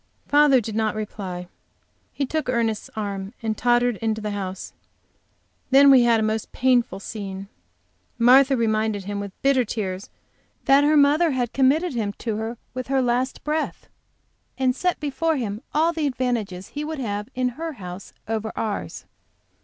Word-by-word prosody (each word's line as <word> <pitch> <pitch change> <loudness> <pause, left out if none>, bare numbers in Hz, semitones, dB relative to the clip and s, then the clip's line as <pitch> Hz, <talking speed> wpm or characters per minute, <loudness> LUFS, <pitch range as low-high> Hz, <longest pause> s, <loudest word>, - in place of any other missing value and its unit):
Father 290 -2 +5
did 220 -1 -5
not 220 -1 0
reply. 190 -4 -5 0.6
He 280 - -2
took 310 0 -2
Ernest's 230 -3 -1
arm 200 -1 -4
and 220 -1 -1
tottered 240 0 +2
into 220 0 -1
the 210 -1 -4
house. 190 -2 -5 1.0
Then 275 +1 +7
we 260 -2 +7
had 235 -1 +4
a - - 0
most 220 0 -2
painful 245 -6 +2
scene. 195 -2 -7 0.7
Martha 260 +3 +6
reminded 220 -3 0
him 200 +1 -4
with 200 -1 -7
bitter 270 -2 +4
tears 200 -4 -4 0.6
that 275 +1 +5
her 300 +1 +4
mother 295 +4 +4
had 250 -4 -1
committed 280 +5 +2
him 215 -4 -2
to 220 0 -4
her 225 +2 -4 0.2
with 255 -1 -5
her 270 0 +1
last 250 +1 0
breath 310 +1 -2 0.7
and 260 -2 +1
set 360 +4 0
before 300 +2 0
him 215 -4 -3
all 325 +3 +2
the 315 -3 0
advantages 230 -8 -2
he 295 - -5
would 315 +1 -4
have 210 -4 -3
in 255 0 +1
her 320 +6 -5
house 185 -5 -9 0.2
over 220 0 -2
ours. 215 -2 -4
240 Hz, 160 wpm, -23 LUFS, 210-270 Hz, 1.0 s, Then